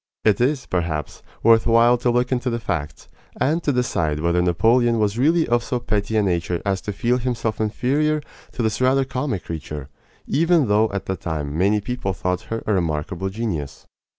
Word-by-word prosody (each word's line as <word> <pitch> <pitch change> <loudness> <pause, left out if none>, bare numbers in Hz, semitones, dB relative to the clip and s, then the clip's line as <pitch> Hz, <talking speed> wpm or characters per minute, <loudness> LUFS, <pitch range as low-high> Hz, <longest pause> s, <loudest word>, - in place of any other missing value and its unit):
It 110 +2 +3
is, 130 0 +1
perhaps, 80 -4 -3 0.2
worth 115 0 +5
while 115 +1 +5
to 120 - +1
look 125 +1 +1
into 125 0 0
the 115 - -1
facts, 80 - -4 0.3
and 160 +5 +1
to 150 - +1
decide 85 - 0
whether 85 +2 +1
Napoleon 115 +7 +3
was 105 +1 0
really 160 +4 +3
of 120 0 +2
so 125 +1 -2
petty 110 -2 -1
a 105 - +3
nature 85 -2 0
as 95 -1 0
to 105 - -4
feel 120 +5 0
himself 115 -3 -2
inferior 145 +8 0 0.3
to 120 - -2
this 110 +2 -1
rather 135 +1 +3
comic 130 -6 -3
creature, 75 -4 -6 0.4
even 165 -2 +2
though 110 +2 +3
at 100 -1 -4
the 95 - -2
time 75 -5 -4
many 100 +5 +2
people 110 -4 -3
thought 90 0 -2
her 115 0 -3
a 105 - +1
remarkable 85 +1 -1
genius. 95 -9 -4
110 Hz, 185 wpm, -22 LUFS, 90-125 Hz, 0.4 s, worth